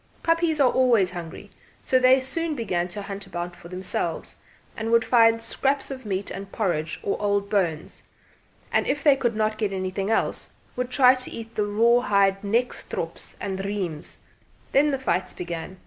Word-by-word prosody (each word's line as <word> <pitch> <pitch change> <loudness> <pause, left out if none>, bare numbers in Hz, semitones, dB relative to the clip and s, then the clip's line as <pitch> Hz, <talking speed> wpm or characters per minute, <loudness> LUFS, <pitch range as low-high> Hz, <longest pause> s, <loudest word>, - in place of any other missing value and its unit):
Puppies 330 -2 +2
are 260 -3 +5
always 235 -8 +3
hungry, 175 +3 -8 0.3
so 260 - +3
they 255 +1 +6
soon 315 +4 -3
began 180 -8 -1
to 200 +3 -6
hunt 195 0 -6
about 175 -1 -5
for 170 - -13
themselves, 180 -2 -3 0.4
and 220 +1 -3
would 230 0 +4
find 230 -1 +4
scraps 275 +4 0
of 260 -4 -7
meat 195 0 -2
and 195 0 -7
porridge 170 -8 -1
or 200 - -2
old 200 -1 0
bones; 170 -7 -1 0.7
and - - +1
if 280 0 -1
they 290 -3 +6
could 240 -4 -1
not 215 0 0
get 210 -3 0
anything 190 +1 -2
else, 225 - 0 0.2
would 250 0 -2
try 255 -1 +6
to 255 -1 -4
eat 225 0 -8
the 210 - 0
raw 230 +4 +4
hide 200 -4 +2
nekstrops 230 +5 -2
and 195 -1 -3
reims. 190 -6 -4 0.5
Then 290 +2 +4
the 275 - 0
fights 185 -7 -1
began. 175 +1 -6
210 Hz, 175 wpm, -25 LUFS, 190-250 Hz, 0.7 s, they